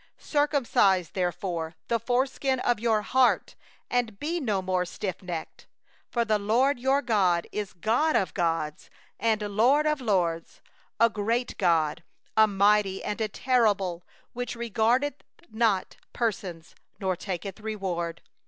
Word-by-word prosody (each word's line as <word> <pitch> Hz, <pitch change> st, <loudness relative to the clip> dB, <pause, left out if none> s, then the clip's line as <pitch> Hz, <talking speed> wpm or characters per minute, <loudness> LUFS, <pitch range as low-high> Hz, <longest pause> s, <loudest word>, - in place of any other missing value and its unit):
16Circumcise 250 Hz, -, +2 dB
therefore 175 Hz, -3 st, -2 dB
the 230 Hz, -, +1 dB
foreskin 260 Hz, +2 st, 0 dB
of 240 Hz, -3 st, +1 dB
your 220 Hz, -2 st, +1 dB
heart, 255 Hz, +3 st, +2 dB, 0.3 s
and 235 Hz, -5 st, -1 dB
be 335 Hz, +4 st, -2 dB
no 215 Hz, -, 0 dB
more 185 Hz, -1 st, 0 dB
stiffnecked. 180 Hz, -2 st, -6 dB, 0.5 s
17For 235 Hz, -1 st, 0 dB
the 215 Hz, -1 st, +2 dB
LORD 245 Hz, +6 st, +2 dB
your 270 Hz, +3 st, +2 dB
God, 185 Hz, -7 st, +2 dB
He -, -, -3 dB
is 205 Hz, -2 st, -5 dB
God 230 Hz, -, +1 dB
of 190 Hz, -, +1 dB
gods, 165 Hz, -3 st, -2 dB, 0.3 s
and 220 Hz, -1 st, +1 dB
Lord 235 Hz, +9 st, +3 dB
of 300 Hz, -2 st, +1 dB
lords, 175 Hz, -7 st, -1 dB, 0.4 s
the 230 Hz, -, +7 dB
great 230 Hz, +4 st, -1 dB
God, 165 Hz, -3 st, +2 dB, 0.3 s
the 220 Hz, 0 st, +6 dB
mighty, 200 Hz, -1 st, +2 dB
and 210 Hz, -, -3 dB
the 220 Hz, -1 st, 0 dB, 0.2 s
awful, 205 Hz, -8 st, +2 dB, 0.3 s
who 245 Hz, 0 st, -3 dB
regardeth 235 Hz, +5 st, 0 dB, 0.3 s
not 220 Hz, -4 st, 0 dB, 0.2 s
persons, 185 Hz, -7 st, -3 dB, 0.3 s
nor 190 Hz, -2 st, 0 dB
taketh 185 Hz, +1 st, -5 dB
reward. 185 Hz, -6 st, -4 dB
210 Hz, 135 wpm, -27 LUFS, 185-240 Hz, 0.5 s, the